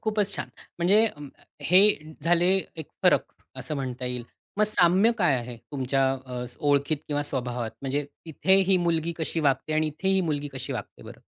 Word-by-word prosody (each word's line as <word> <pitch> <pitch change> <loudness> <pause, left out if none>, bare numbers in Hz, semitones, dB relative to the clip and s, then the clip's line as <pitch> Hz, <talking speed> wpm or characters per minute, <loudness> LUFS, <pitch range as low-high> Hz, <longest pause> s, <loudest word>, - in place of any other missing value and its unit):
खूपच 210 -2 0
छान. - - -4 0.3
म्हणजे 200 +6 +4
अ, 150 - -7 0.4
हे 180 +3 +5 0.4
झाले 175 +2 +3 0.3
एक 160 -2 -7
फरक - - +4 0.3
असं 155 - -5
म्हणता 130 -2 -4
येईल. 125 -1 -3 0.3
मग 215 - +5
साम्य 190 +1 +4
काय 170 -7 +3
आहे 120 -1 -6 0.2
तुमच्या 135 0 0 0.2
अ, 125 -1 -5 0.2
ओळखीत 145 +2 +2
किंवा 145 -1 -1
स्वभावात 125 -5 -3
म्हणजे 140 +2 -1 0.2
तिथे 165 +4 +2 0.2
ही 190 - +6
मुलगी 170 0 0
कशी 160 +1 -2
वागते 145 +1 0
आणि 155 0 +1
इथे 155 +6 -3
ही 190 0 +3
मुलगी 150 -4 -2
कशी 130 -1 -5
वागते - - -7
बरं? - - -12
150 Hz, 175 wpm, -26 LUFS, 135-175 Hz, 0.4 s, ही